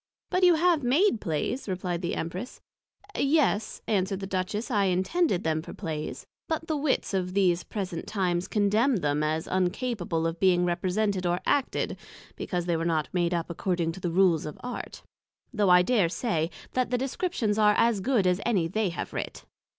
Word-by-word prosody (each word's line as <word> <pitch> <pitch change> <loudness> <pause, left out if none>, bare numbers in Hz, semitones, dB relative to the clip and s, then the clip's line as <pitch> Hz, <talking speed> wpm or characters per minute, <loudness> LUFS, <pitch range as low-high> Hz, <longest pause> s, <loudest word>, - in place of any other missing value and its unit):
But 365 - +1
you 355 -2 +7
have 335 -1 +3
made 270 - +2
Plays, 175 - -2
replied 180 -2 -2
the 175 - -2
Empress: 180 +9 -5 0.6
Yes, 275 -7 +1
answered 195 -2 0
the 195 - -4
Duchess, 195 +5 -3
I 205 -3 +2
intended 190 - +1
them 160 -1 0
for - - -10
Plays; 155 -5 -5 0.2
but 325 -1 -2
the 315 - -1
Wits 285 -7 0
of 185 -1 -1
these 180 -3 +3
present 185 -5 -5
times 185 -3 -1
condemned 210 - +2
them 145 0 +1
as 155 +1 -1
uncapable 185 -2 -1
of 165 0 -2
being 180 -2 +4
represented 185 +2 0
or 175 +1 +1
acted, 280 -2 0 0.4
because 175 -2 -3
they 175 -1 +1
were 165 - -2
not 160 -3 0
made 175 -1 +1
up 170 -1 -2
according 170 -1 -1
to 170 - -9
the 175 - -2
Rules 170 -3 +3
of 150 - -7
Art; 250 0 -6 0.5
though 210 -4 +2
I 180 0 +7
dare 205 -5 +2
say, 165 -3 -1 0.2
That 255 -1 0
the 250 - +1
Descriptions 255 - -1
are 210 -1 +5
as 230 -4 +3
good 230 -3 +2
as 180 +1 +2
any 195 -8 +1
they 210 +3 0
have 170 - -5
writ. - - -5
190 Hz, 180 wpm, -27 LUFS, 175-235 Hz, 0.6 s, you